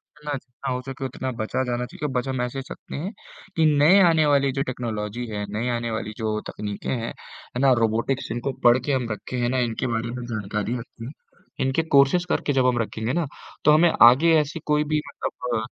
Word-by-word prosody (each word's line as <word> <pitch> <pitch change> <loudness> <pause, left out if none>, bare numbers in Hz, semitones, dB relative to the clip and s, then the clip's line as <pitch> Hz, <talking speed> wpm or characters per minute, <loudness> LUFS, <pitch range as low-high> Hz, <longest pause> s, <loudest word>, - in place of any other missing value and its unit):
जितना 150 0 -5
जितना 130 +1 -7
हो 125 - -3
सके 135 0 -6
उतना 130 0 -4
बचा 110 +4 -1
जाना 125 0 -2
चाहिए। 150 +5 -5
बच 125 +1 -1
हम 130 -2 -1
ऐसे 125 +2 -3
सकते - - -9
हैं 180 +8 -4 0.5
कि 160 - +4
नए 175 +7 +7
आने 160 -2 +3
वाली 140 -2 +3
जो 135 - -1
टेक्नोलॉज़ी 115 -2 -4
है, 105 -1 -4
नई 110 +4 -2
आने 115 -1 -3
वाली 110 -1 -4
जो 110 -1 -1
तकनीकें 105 -1 -5
हैं, 115 -3 -2
है 125 - -10
ना 135 -1 +5
रोबोटिक्स 115 +3 0
इनको 120 +3 -2
पढ़ 120 +1 +7
के 145 - +1
हम 125 -3 -1
रखें 125 +4 -5
है 120 - +1
ना 130 0 +1
इनके 115 +3 -3
बारे 115 +1 -2
में 125 0 -5
जानकारी 110 +1 -3
रखते 115 0 -10
हैं। 135 - -6 0.5
इनके 135 +5 +1
कोर्सेज़ 140 +6 +5
करके 145 - 0
जब 130 -2 +3
हम 125 -1 +2
रखेंगे 110 +2 -3
ना, 170 -1 0 0.4
तो 150 - +7
हमें 165 +2 +5
आगे 135 +8 +7
ऐसी 150 +2 -2
कोई 150 0 +3
भी 150 - +3
मतलब 120 -3 -3
125 Hz, 215 wpm, -24 LUFS, 115-140 Hz, 0.5 s, नए